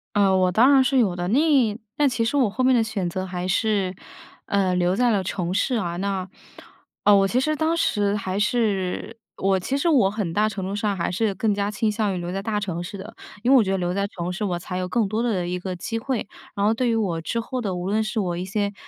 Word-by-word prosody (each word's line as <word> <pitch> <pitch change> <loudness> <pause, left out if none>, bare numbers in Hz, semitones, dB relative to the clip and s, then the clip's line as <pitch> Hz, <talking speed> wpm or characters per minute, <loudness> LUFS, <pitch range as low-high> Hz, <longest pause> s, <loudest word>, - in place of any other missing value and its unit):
呃， 195 -2 +4
我 185 -1 +3
当 250 +9 +5
然 270 - +6
是 270 +1 +1
有 205 -8 +2
的， 175 0 -3
那 235 +9 +3 0.6
但 290 -1 +3
其 230 -2 -1
实 255 - -1
我 255 -6 +3
后 255 +6 -2
面 255 0 +5
的 230 - +3
选 205 -5 -2
择 185 +2 -3
还 180 -1 -4
是， 195 -1 0 0.5
呃， 195 -2 +1
留 180 0 +1
在 245 +2 +3
了 200 -3 +1
城 180 -1 -3
市 245 +6 +1
啊。 175 -6 -2
那 195 0 -2 0.8
呃， 205 - +6
我 195 0 +4
其 240 +6 +1
实 310 +3 0
当 320 +2 0
时 205 -10 +1
还 195 -1 -2
是 210 -1 -1 0.2
我 195 0 +1
其 260 +9 -2
实 280 - 0
我 265 -12 +4
很 200 -5 -3
大 215 +3 +2
程 195 -3 -5
度 195 +2 -3
上 205 -1 -1
还 170 - -1
是 200 +1 0
更 220 -4 +1
加 200 0 -1
倾 210 +1 0
向 210 -2 -1
于 - - -3
留 175 0 -4
在 195 +1 -3
大 210 0 -1
城 180 -4 -3
市 190 +3 -7
的。 210 +4 -10 0.3
因 250 - +3
为 275 - +8
我 240 - +5
觉 190 - -2
得 195 - +1
留 175 -1 -1
在 200 +1 0
城 180 -3 -5
市 185 - -4
我 180 -4 -1
才 180 +1 -5
有 185 0 -2
更 220 +2 +1
多 215 +3 -1
的 200 -7 0
一 180 +1 -2
个 185 0 -4
机 225 +6 -4
会， 235 -3 -3 0.3
然 200 0 0
后 215 - +4
对 245 +2 0
于 230 - +2
我 180 -7 -1
之 230 +8 -2
后 250 +2 -4
的 195 -5 -2
无 180 +1 -4
论 215 +2 +1
是 215 +1 -2
我 180 -4 -1
一 175 - -3
些， 200 +2 -2
200 Hz, 285 characters per minute, -23 LUFS, 185-225 Hz, 0.8 s, 为